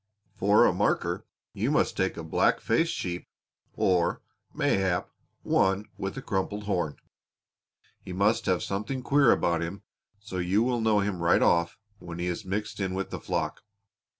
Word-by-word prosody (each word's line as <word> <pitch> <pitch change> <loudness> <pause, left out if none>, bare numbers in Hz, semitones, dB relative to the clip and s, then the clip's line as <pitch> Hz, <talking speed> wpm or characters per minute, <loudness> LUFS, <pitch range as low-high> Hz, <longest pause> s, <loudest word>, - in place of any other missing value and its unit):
"For 100 +2 +5
a - - +3
marker - - 0 0.3
you - - -1
must - - +2
take 95 0 0
a 85 - -5
black 80 - +2
faced 165 +9 +1
sheep 90 -1 -4 0.5
or, 90 -5 +1 0.3
mayhap, 95 -3 0 0.3
one 95 +2 +2
with 95 +6 -5
a 135 - -5
crumpled 100 +2 -2
horn; 90 -7 -1 1.1
he - - -9
must 105 +4 +1
have 90 -4 +1
something 110 +7 -3
queer 140 0 +5
about 85 -1 +2
him 85 +4 -5 0.4
so 100 -3 -6
you 95 +5 +2
will 120 -1 0
know 110 -2 +3
him 100 -3 -2
right 85 - +4
off 85 0 +2 0.2
when 85 -1 -8
he 85 - -2
is 90 -1 -3
mixed 105 +3 -4
in 95 -1 -1
with 95 0 -3
the - - -4
flock. - - -2
95 Hz, 165 wpm, -28 LUFS, 90-105 Hz, 1.1 s, For